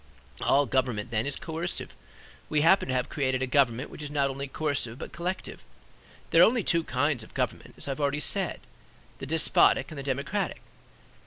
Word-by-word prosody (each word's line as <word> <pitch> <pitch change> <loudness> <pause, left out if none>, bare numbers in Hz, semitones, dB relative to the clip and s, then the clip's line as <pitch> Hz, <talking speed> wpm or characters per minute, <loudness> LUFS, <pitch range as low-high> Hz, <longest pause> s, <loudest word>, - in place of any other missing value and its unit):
All 140 +1 +3
government 125 -4 -1
then 110 +2 0
is 140 - -1
coercive; 165 +2 -4 0.5
we 150 - +2
happen 190 +5 +4
to 130 - -1
have 125 -1 0
created 130 -2 -1
a - - +2
government 130 -1 +1
which - - -10
is 150 - -5
not 140 -2 0
only 140 +1 -5
coercive; 135 -5 -2
but - - -8
collective. 175 +4 -5 0.7
There - - +6
are - - +10
only 235 -1 +2
two 170 -1 +2
kinds 135 -1 0
of 110 - -12
government, - - -3
as - - -6
I - - -1
have 135 - -4
already 145 +1 +1
said, 130 - +1 0.6
the 135 - -6
despotic 150 -2 +4
and 155 - -7
the - - -5
democratic. 135 0 -2
140 Hz, 190 wpm, -28 LUFS, 130-150 Hz, 0.7 s, are